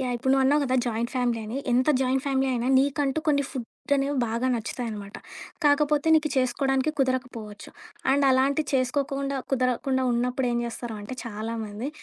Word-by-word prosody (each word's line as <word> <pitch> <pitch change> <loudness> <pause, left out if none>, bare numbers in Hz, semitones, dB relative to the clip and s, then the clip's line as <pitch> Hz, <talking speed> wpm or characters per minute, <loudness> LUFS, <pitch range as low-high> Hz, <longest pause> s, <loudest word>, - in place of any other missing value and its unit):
Yeah! 250 -2 -1
ఇప్పుడు 260 +3 -1
నువ్వన్నావు 270 +2 +4
కదా! 260 -1 0
Joint 235 +1 -1
family 245 -2 0
అని. 235 +5 -5 0.2
ఎంత 255 +4 +2
జాయింట్ 260 0 +1
ఫ్యామిలీ 270 -1 +1
అయినా 240 0 -1
నీకంటూ 280 +1 +1
కొన్ని 285 -2 +3
ఫుడ్ 255 +2 -6
అనేవి 275 +1 0
బాగా 235 +3 -1
నచ్చుతాయనమాట. 220 -3 -5 0.5
కాకపోతే 295 +1 +3
నీకు 305 -1 +2
చేసుకోడానికి 265 +2 +1
కుదరకపోవచ్చు. 250 -5 -2 0.4
అండ్ 280 +1 +3
అలాంటివి 275 +3 +2
చేసుకోకుండా, 275 +1 0
కుదరకుండా 260 +1 +1
ఉన్నప్పుడేం 245 0 0
చేస్తారు 235 -1 -6
అంటే 255 +5 -7
చాలామంది, 220 +1 -5
260 Hz, 145 wpm, -26 LUFS, 235-275 Hz, 0.5 s, నువ్వన్నావు